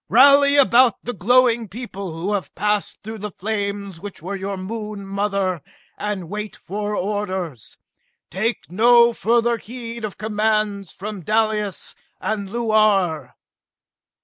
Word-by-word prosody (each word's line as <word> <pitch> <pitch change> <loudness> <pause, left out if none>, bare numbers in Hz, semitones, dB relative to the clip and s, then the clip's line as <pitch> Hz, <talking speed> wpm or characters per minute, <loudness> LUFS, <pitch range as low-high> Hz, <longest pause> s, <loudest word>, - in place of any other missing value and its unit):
Rally 280 +4 +7
about 255 -4 +6
the 245 - -3
glowing 235 +2 +3
people 195 -6 -7
who 195 +5 -1
have 190 -7 -3
passed 210 +1 0
through 220 +1 -7
the 210 +1 -4
flames 200 -3 -4
which 205 -1 -7
were 185 +5 -5
your 195 0 -4
Moon 210 +1 -6
mother, 195 -3 -1 0.3
and 205 -4 -4
wait 210 +3 -5
for 205 +3 -4
orders! 190 - -3 0.5
Take 220 0 -2
no 235 +4 +6
further 235 +1 +2
heed 235 0 -7
of 210 -3 -5
commands 215 -2 0
from 205 0 -7
Dalis 215 0 0 0.3
and 205 -3 -2
Luar!" 205 - +2
210 Hz, 125 wpm, -21 LUFS, 195-225 Hz, 0.5 s, Rally